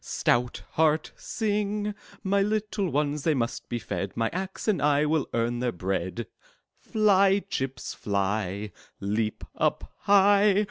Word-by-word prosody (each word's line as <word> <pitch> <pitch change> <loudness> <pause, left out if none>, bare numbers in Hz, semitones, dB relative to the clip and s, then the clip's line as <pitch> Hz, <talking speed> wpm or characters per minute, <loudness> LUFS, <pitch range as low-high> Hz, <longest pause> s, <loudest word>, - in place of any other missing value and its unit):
Stout 120 0 0
heart, 155 0 +2
sing! 210 -1 -1 0.3
My 200 +1 +2
little 210 -1 0
ones, 150 0 0
they 155 +1 +2
must 120 -3 -2
be 120 - -1
fed; 100 -4 -4
My 115 -1 +1
axe 190 +3 -4
and 195 -9 +2
I 145 0 +3
will 150 -2 0
earn 120 +1 0
their 125 -1 0
bread! 95 +4 -3 0.7
'Tly, 200 -2 +4
chips, 130 -2 -3
fly! 100 0 -2 0.3
Leap 105 +2 -1
up - - -1
high! 200 0 +5
150 Hz, 135 wpm, -27 LUFS, -, 0.7 s, high